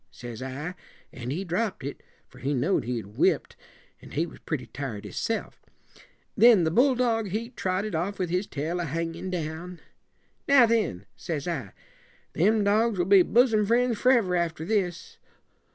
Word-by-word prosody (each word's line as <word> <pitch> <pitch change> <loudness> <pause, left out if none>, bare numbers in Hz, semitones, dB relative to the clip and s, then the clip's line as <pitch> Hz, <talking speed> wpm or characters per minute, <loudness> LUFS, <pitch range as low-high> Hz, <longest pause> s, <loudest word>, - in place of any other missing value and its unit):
says 120 -2 -9
I; 135 +7 -5 0.4
an' 125 -1 -6
he 165 +8 -2
dropped 190 - -2
it, 140 - -6 0.3
for - - -17
he 140 +2 -1
know'd 140 - +1
he'd 120 -3 -3
whipped, - - +1 0.5
and - - -12
he 160 +3 +1
was 170 - -12
pretty 150 -6 -4
tired 125 -7 -6
hisself. 105 - -4 0.7
Then 225 -4 +7
the 160 - +1
bulldog, 245 - +2
he 220 +5 -3
trotted 190 -2 -2
off 180 +5 -2
with 180 -3 -2
his 180 +3 0
tail 160 +5 -3
a 175 - -1
hangin' 165 +4 -3
down. 170 0 -5 0.7
'Now, 275 -3 +7
then,' 210 - 0
says 155 -3 -4
I, 130 - -4 0.6
'them 210 +6 +3
dogs 215 +1 +2
will 175 - +1
be 195 0 +7
bosom 225 +1 +3
friends 235 +1 +2
forever 235 -8 +3
after 165 -2 -1
this.' 180 -4 -2
180 Hz, 160 wpm, -27 LUFS, 155-215 Hz, 0.7 s, Then